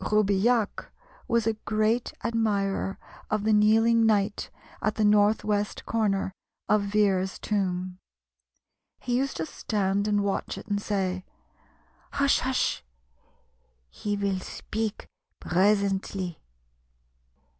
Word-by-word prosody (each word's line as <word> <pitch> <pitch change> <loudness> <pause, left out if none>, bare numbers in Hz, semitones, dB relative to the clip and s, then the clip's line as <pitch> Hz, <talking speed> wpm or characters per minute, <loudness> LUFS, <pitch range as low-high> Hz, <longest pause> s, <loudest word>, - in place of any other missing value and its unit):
Roubilliac 210 +2 +1 0.4
was 235 -2 +2
a 225 - +2
great 215 +2 0
admirer 205 -4 0 0.3
of 215 -1 0
the 220 0 +3
kneeling 225 +2 +4
knight 210 -2 +1 0.3
at 215 - 0
the 215 - +2
north 210 +1 +4
west 205 -1 -1
corner 200 -4 0 0.3
of 210 -1 +3
Vere's 200 -2 +1
tomb. 185 -3 -2 1.0
He 245 - -2
used 270 +2 0
to 160 - -2
stand 200 +2 -1
and 205 -1 +2
watch 200 -1 -2
it, - - -8
and 205 -1 -1
say, 190 -3 -1 0.9
"Hush! 280 0 +3
hush! 260 - 0 1.1
he 205 - -3
vill 200 -2 -1
speak 220 +3 -4 0.3
presently." 195 -2 +1
205 Hz, 110 wpm, -27 LUFS, 195-220 Hz, 1.1 s, kneeling